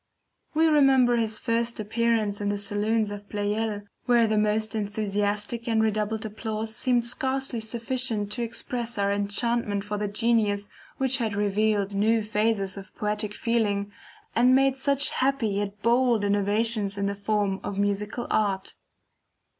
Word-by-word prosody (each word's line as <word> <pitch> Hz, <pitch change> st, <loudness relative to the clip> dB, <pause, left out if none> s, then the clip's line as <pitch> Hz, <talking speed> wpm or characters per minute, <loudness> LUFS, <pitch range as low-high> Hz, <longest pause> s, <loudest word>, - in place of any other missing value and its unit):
We 320 Hz, +1 st, +4 dB
remember 270 Hz, -6 st, +4 dB
his 220 Hz, -2 st, +1 dB
first 230 Hz, +1 st, 0 dB
appearance 215 Hz, -1 st, 0 dB
in 205 Hz, -, -1 dB
the 205 Hz, -, -1 dB
saloons 205 Hz, +2 st, 0 dB
of 205 Hz, 0 st, -9 dB
Pleyel, 210 Hz, 0 st, -2 dB, 0.2 s
where 240 Hz, -2 st, +4 dB
the 220 Hz, -1 st, 0 dB
most 215 Hz, +1 st, +1 dB
enthusiastic 210 Hz, +2 st, -2 dB
and 225 Hz, -1 st, +2 dB
redoubled 215 Hz, 0 st, -1 dB
applause 220 Hz, 0 st, -4 dB
seemed 245 Hz, -1 st, +1 dB
scarcely 265 Hz, 0 st, -1 dB
sufficient 230 Hz, -1 st, 0 dB
to 240 Hz, -, -1 dB
express 235 Hz, 0 st, -2 dB
our 200 Hz, 0 st, +1 dB
enchantment 205 Hz, +1 st, 0 dB
for 210 Hz, 0 st, -4 dB
the 210 Hz, -, -1 dB
genius 205 Hz, -1 st, 0 dB, 0.3 s
which 265 Hz, 0 st, +2 dB
had 225 Hz, -5 st, -2 dB
revealed 205 Hz, 0 st, 0 dB
new 220 Hz, +3 st, +2 dB
phases 210 Hz, -2 st, 0 dB
of 195 Hz, -1 st, -11 dB
poetic 210 Hz, 0 st, -2 dB
feeling, 205 Hz, -3 st, 0 dB, 0.4 s
and 250 Hz, +2 st, +5 dB
made 270 Hz, 0 st, +3 dB
such 280 Hz, +1 st, +2 dB
happy 265 Hz, -4 st, 0 dB
yet 205 Hz, +1 st, -4 dB
bold 235 Hz, -2 st, +3 dB
innovations 205 Hz, +1 st, +1 dB
in 200 Hz, -, -1 dB
the 200 Hz, -, -1 dB
form 200 Hz, -1 st, -1 dB
of 200 Hz, -, -5 dB
musical 205 Hz, +4 st, -1 dB
art. 195 Hz, -3 st, 0 dB
215 Hz, 145 wpm, -26 LUFS, 205-235 Hz, 0.4 s, and